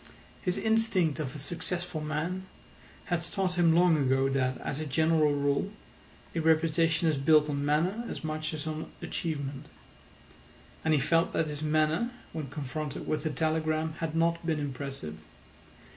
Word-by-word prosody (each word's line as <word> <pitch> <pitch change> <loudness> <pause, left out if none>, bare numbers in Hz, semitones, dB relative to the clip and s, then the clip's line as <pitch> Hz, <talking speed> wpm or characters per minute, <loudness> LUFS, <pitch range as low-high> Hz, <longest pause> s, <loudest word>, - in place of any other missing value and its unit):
His 180 -2 -1
instinct 220 -8 +2
of 150 -1 -3
a - - -4
successful 175 +2 -3
man 165 +5 -2 0.6
had 175 -2 0
taught 185 +1 -1
him 170 -2 +4
long 175 -1 +5
ago 135 -1 +2
that, 130 -1 +1
as 140 - -3
a 155 - -3
general 155 +2 +3
rule, 145 +7 +1 0.6
a 170 - -1
reputation 160 +1 +3
is 155 -3 +2
built 150 +2 +5
on 140 -1 -1
manner 170 +10 +1
as - - -6
much 155 0 -2
as 155 -2 -5
on 155 0 -4
achievement. 145 -3 -3 1.2
And 160 -1 +3
he - - +3
felt 165 +4 +2
that 165 - +2
his 150 -1 -5
manner 155 +8 +2 0.2
when 155 -4 -4
confronted 150 +1 -4
with 155 -1 0
the 155 - -1
telegram 155 +1 0
had 165 -1 -2
not 170 +1 +2
been 160 -2 0
impressive. 135 - -4
155 Hz, 160 wpm, -29 LUFS, 145-165 Hz, 1.2 s, long